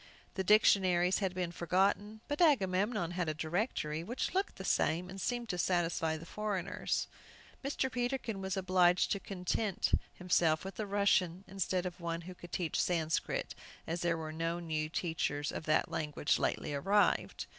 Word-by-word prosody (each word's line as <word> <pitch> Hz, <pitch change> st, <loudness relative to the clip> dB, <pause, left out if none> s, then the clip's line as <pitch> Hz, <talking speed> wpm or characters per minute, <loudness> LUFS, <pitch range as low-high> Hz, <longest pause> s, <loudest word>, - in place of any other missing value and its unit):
The 190 Hz, -, -2 dB
dictionaries 185 Hz, -3 st, +4 dB
had 190 Hz, -3 st, -1 dB
been 180 Hz, -2 st, -2 dB
forgotten, 200 Hz, +5 st, 0 dB
but 290 Hz, +3 st, -2 dB
Agamemnon 205 Hz, -, +2 dB
had 175 Hz, -2 st, -1 dB
a 155 Hz, -, -2 dB
directory, 160 Hz, -1 st, -2 dB
which 240 Hz, -, -3 dB
looked 385 Hz, +2 st, 0 dB
the -, -, -7 dB
same, 180 Hz, +3 st, +1 dB
and 195 Hz, 0 st, -7 dB
seemed 240 Hz, -1 st, -2 dB
to 180 Hz, -, -2 dB
satisfy 165 Hz, -3 st, +1 dB
the 160 Hz, -, -10 dB
foreigners. 200 Hz, -1 st, -2 dB, 0.6 s
Mr. 270 Hz, -1 st, -1 dB
Peterkin 245 Hz, -4 st, -2 dB
was 190 Hz, 0 st, -2 dB
obliged 180 Hz, -1 st, +3 dB
to 200 Hz, -, +1 dB
content 195 Hz, +2 st, -1 dB, 0.2 s
himself 175 Hz, -2 st, +2 dB
with 195 Hz, -, -5 dB
the 215 Hz, -, -3 dB
Russian 195 Hz, -3 st, +2 dB
instead 190 Hz, -1 st, -1 dB
of 180 Hz, -1 st, -5 dB
one 170 Hz, 0 st, -2 dB
who 185 Hz, +2 st, -8 dB
could 175 Hz, -1 st, -12 dB
teach 170 Hz, -4 st, 0 dB
Sanscrit, 165 Hz, -3 st, -1 dB, 0.3 s
as 170 Hz, +2 st, -3 dB
there 170 Hz, -1 st, +1 dB
was 155 Hz, -1 st, -5 dB
no 165 Hz, +2 st, -2 dB
new 155 Hz, -2 st, -2 dB
teacher 160 Hz, -3 st, -1 dB
of -, -, -5 dB
that 155 Hz, +2 st, +2 dB
language 150 Hz, -2 st, 0 dB
lately -, -, -1 dB
arrived. 200 Hz, +8 st, +2 dB
180 Hz, 165 wpm, -33 LUFS, 165-200 Hz, 0.6 s, dictionaries